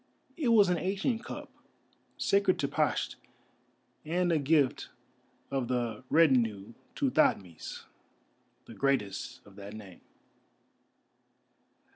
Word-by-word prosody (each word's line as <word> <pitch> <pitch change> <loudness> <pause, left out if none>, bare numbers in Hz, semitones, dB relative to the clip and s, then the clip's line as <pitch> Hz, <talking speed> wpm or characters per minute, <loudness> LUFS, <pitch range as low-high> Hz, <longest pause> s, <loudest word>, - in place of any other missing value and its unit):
It 300 -6 -2
was 220 -4 +6
an 175 -2 +1
ancient 210 +5 -1
cup, - - -8 0.7
sacred 200 -2 +2
to 140 - 0
Pasht, - - 0 0.9
and 175 +3 0
a 160 - +3
gift 145 -2 +2 0.6
of 135 -3 -1
the 120 -2 -2
Rutennu 115 -9 +3 0.2
to - - 0
Thothmes, 90 -5 0 0.8
the - - -11
greatest 105 -9 -1
of 100 - -17
that 100 +1 -9
name. 100 -5 -11
135 Hz, 105 wpm, -30 LUFS, 110-180 Hz, 0.9 s, was